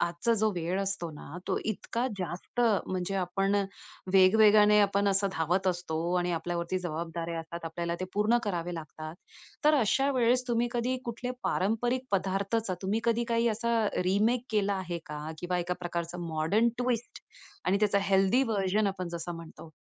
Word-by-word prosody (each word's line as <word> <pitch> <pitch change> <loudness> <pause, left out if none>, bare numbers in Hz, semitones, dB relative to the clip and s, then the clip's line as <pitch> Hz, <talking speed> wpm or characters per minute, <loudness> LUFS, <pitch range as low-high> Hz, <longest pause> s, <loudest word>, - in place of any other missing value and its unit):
आजचा 170 +7 +1
जो 220 - +3
वेळ 175 +3 -1
असतो 190 -4 -2
ना 150 +2 -9
तो - - +1
इतका 230 +3 -2
जास्त 180 +6 -4 0.3
म्हणजे 185 +1 -2
आपण 195 +2 0 0.6
वेगवेगाने 210 +2 +6
आपण 200 0 +2
असं 195 0 +2
धावत 175 +4 0
असतो 175 -1 -1
आणि 175 0 0
आपल्याला 170 +1 -2
वरती 170 +2 -1
जबाबदाऱ्या 170 0 -4
असतात. 170 +1 -8
आपल्याला 170 +1 -3
ते 185 - -1
पूर्ण 210 +4 +3
करावे 175 -3 -2
लागतात. 155 0 -7 0.5
तर 305 +1 +6
अशा 270 +5 +2
वेळेस 250 0 +2
तुम्ही 240 0 +1
कधी 245 +2 0
कुठल्या 245 +1 -4
पारंपरिक 240 +6 0
पदार्थाचा 195 +2 0
तुम्ही 200 +4 0
कधी 235 0 +2
काही 230 0 +2
असा 230 +1 0 0.3
रिमेक 220 +6 +2
केला 205 -2 +1
आहे 180 -3 -3
का? 150 0 -6
किंवा 180 +1 -1
एका 175 +1 -1
प्रकारचं 175 0 -4
मॉडर्न 165 +9 +2
ट्विस्ट 245 -2 -2 0.4
आणि 190 +2 +3
त्याचा 205 -1 +3
हेल्थी 195 +5 +3
व्हर्जन 210 -3 +1
आपण 185 -2 -3
जसं 170 0 -5
म्हणतो 165 -1 -11
195 Hz, 160 wpm, -29 LUFS, 175-220 Hz, 0.6 s, वेगवेगाने